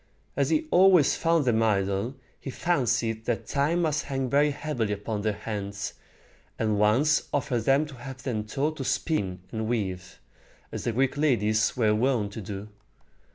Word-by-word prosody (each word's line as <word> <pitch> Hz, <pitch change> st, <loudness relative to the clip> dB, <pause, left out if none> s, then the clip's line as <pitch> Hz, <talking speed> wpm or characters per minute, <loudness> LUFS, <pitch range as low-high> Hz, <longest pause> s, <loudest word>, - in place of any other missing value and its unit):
As -, -, +1 dB
he 315 Hz, 0 st, +1 dB
always 180 Hz, -5 st, +6 dB
found 165 Hz, -3 st, +2 dB
them 115 Hz, -3 st, +2 dB
idle, 100 Hz, +2 st, 0 dB, 0.2 s
he -, -, -7 dB
fancied 120 Hz, -8 st, 0 dB
that 120 Hz, -, -2 dB
time 155 Hz, +5 st, +1 dB
must 155 Hz, -2 st, 0 dB
hang 135 Hz, -2 st, -2 dB
very 145 Hz, +1 st, +4 dB
heavily 140 Hz, -8 st, -2 dB
upon 105 Hz, +1 st, -4 dB
their 110 Hz, +1 st, +1 dB
hands, 100 Hz, -1 st, -5 dB, 0.6 s
and 110 Hz, -2 st, 0 dB
once 125 Hz, +9 st, +3 dB
offered 130 Hz, -5 st, -1 dB
to 140 Hz, +1 st, +2 dB
have 130 Hz, 0 st, -9 dB
them 110 Hz, -5 st, -2 dB
taught 145 Hz, +8 st, -2 dB
to 135 Hz, -, -3 dB
spin 95 Hz, -, -1 dB
and 110 Hz, -1 st, -3 dB
weave, 95 Hz, -5 st, -3 dB, 0.5 s
as -, -, -5 dB
the 120 Hz, -, +1 dB
Greek 130 Hz, +4 st, 0 dB
ladies 110 Hz, -8 st, +2 dB
were 110 Hz, -3 st, +3 dB
wont 110 Hz, -3 st, +1 dB
to 110 Hz, -, -6 dB
do. 100 Hz, +1 st, -7 dB
120 Hz, 160 wpm, -27 LUFS, 105-145 Hz, 0.6 s, always